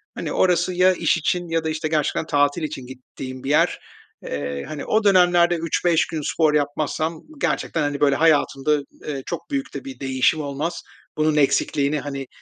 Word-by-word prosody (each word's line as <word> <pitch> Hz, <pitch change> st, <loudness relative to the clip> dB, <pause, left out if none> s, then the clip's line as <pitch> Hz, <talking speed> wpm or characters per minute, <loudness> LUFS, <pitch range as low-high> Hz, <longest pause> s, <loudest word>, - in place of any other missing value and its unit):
hani, -, -, -4 dB
orası 180 Hz, 0 st, +2 dB
ya 185 Hz, +1 st, +4 dB
iş 170 Hz, -2 st, +1 dB
için 175 Hz, +2 st, -1 dB
ya 165 Hz, 0 st, 0 dB
da, 160 Hz, -, -1 dB
işte, 155 Hz, 0 st, -2 dB
gerçekten 155 Hz, 0 st, 0 dB
tatil 145 Hz, +2 st, +1 dB
için 145 Hz, -4 st, -5 dB
gittiğim 130 Hz, 0 st, -9 dB
bir 135 Hz, -, -4 dB
yer. 150 Hz, -, +3 dB, 0.4 s
Eee, 70 Hz, -1 st, -4 dB
hani, 150 Hz, -2 st, -6 dB
o 215 Hz, 0 st, +1 dB
dönemlerde 175 Hz, -3 st, +5 dB
3-5 165 Hz, -1 st, +1 dB
gün 160 Hz, -, -4 dB
spor 155 Hz, +1 st, +1 dB
yapmazsam 155 Hz, +2 st, -1 dB, 0.2 s
gerçekten, 155 Hz, 0 st, 0 dB
hani, 145 Hz, -1 st, -1 dB
böyle 140 Hz, -2 st, +3 dB
hayatımda, 150 Hz, -2 st, +2 dB, 0.3 s
eee, 140 Hz, -3 st, -4 dB
çok -, -, -6 dB
büyük 275 Hz, -1 st, -3 dB
de -, -, -7 dB
bir 270 Hz, -1 st, -8 dB
değişim 135 Hz, +3 st, +1 dB
olmaz. 145 Hz, +4 st, -3 dB, 0.4 s
Bunun 155 Hz, 0 st, +2 dB
eksikliğini, 145 Hz, +1 st, +2 dB
hani, 140 Hz, -2 st, -5 dB
155 Hz, 175 wpm, -22 LUFS, 140-170 Hz, 0.4 s, dönemlerde